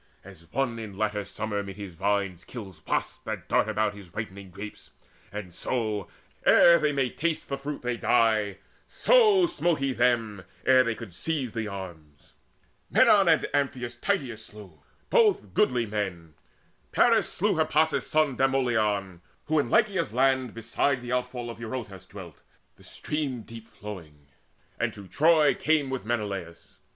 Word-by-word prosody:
As 85 +1 -15
one 125 -3 -1
in 105 -4 -8
latter 105 -1 -1
summer 105 0 -3
'mid 100 -1 -8
his 100 -3 -8
vines 100 0 -1
Kills 95 -9 -9
wasps - - -1
that - - -5
dart 110 - +2
about 110 -1 0
his 100 -4 -13
ripening 100 -3 -6
grapes, 100 +4 -9 0.4
And 100 -3 -7
so, 110 -2 -2 0.4
ere 170 0 +7
they 150 - +1
may 135 -3 0
taste 165 0 -2
the 140 - -1
fruit, 145 0 -5
they 120 -1 -1
die; 110 -4 +2 0.3
So 430 -7 +5
smote 175 - 0
he 135 -1 -1
them, 115 -5 +1 0.2
ere 130 -1 +6
they 115 -2 -1
could 110 -7 -9
seize 135 - -2
the 115 -2 -3
arms. 80 -8 -10 0.6
Menon - - +5
and - - +3
Amphinous 130 -4 -1
Tydeides 120 - -2
slew, 100 -9 -11 0.3
Both 445 -5 +3
goodly 125 - +2
men. 95 -7 -4 0.6
Paris - - +4
slew - - 0
Hippasus' - - +2
son 155 -4 +2
Demoleon, 110 -9 +1 0.2
who 155 0 +2
in 140 - 0
Laconia's 170 - +2
land 130 -2 +2
Beside 120 +3 0
the 120 - -5
outfall 125 -1 -2
of 115 - -11
Eurotas 110 -6 -6
dwelt, 95 -6 -11 0.3
The - - -20
stream 140 -6 -4
deep 115 0 -11
flowing, 80 -9 -10 0.5
and - - -1
to 100 -2 -11
Troy 155 - +4
he - - +3
came 150 -4 +1
With 130 -4 -4
Menelaus. 100 -7 -4
115 Hz, 155 wpm, -27 LUFS, 100-135 Hz, 0.6 s, ere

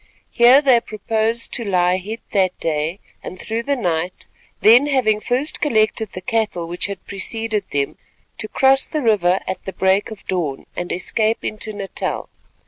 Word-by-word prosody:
Here 250 +4 +6
they 255 -4 +5
proposed 220 +2 -1
to 240 - -2
lie 180 -3 +2
hid 215 +5 -6
that 185 -2 +1
day 160 +3 -1 0.2
and 185 - -8
through 225 +4 -3
the 280 +3 0
night; 175 -6 -2 0.4
then, 240 +6 +7
having 245 -7 +2
first 255 +7 -1
collected 220 -5 +1
the 185 - -6
cattle 205 -4 -1
which 175 +3 -3
had 200 -2 -7
preceded 215 +1 -3
them, 140 -1 -2 0.4
to 215 - -4
cross 270 +3 +3
the 305 -3 -3
river 190 -5 +3
at 185 - -5
the 190 - -5
break 190 +2 +2
of 220 -2 -11
dawn 165 -8 -2
and 175 - -4
escape 215 +5 0
into 215 0 -3
Natal. 200 -2 -4
215 Hz, 165 wpm, -20 LUFS, 185-230 Hz, 0.4 s, then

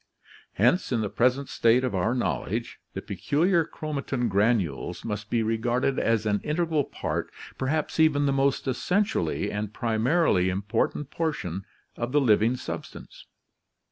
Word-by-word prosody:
Hence 125 - +2
in 120 -3 +1
the 105 - -2
present 130 +3 +2
state 115 +2 +3
of 125 - -1
our 105 +6 +1
knowl 70 - -1
edge, - - -4 0.2
the - - -4
peculiar 170 +3 +1
chromatin 140 -6 -3
granules 100 - 0
must 105 -1 -4
be 115 -2 +1
regarded 120 +4 0
as 115 -1 +1
an 105 -1 +1
integral 155 -1 0
part, - - -4 0.3
perhaps 150 +4 -1
even 145 -2 +4
the 140 - +2
most 135 0 +1
essentially 130 - 0
and 105 +1 -4
primarily 115 - +2
important 105 +8 -1
portion, 100 - -3 0.3
of 120 +2 -3
the 145 - +5
living 115 0 +3
substance. - - -8
120 Hz, 140 wpm, -26 LUFS, 105-145 Hz, 0.3 s, the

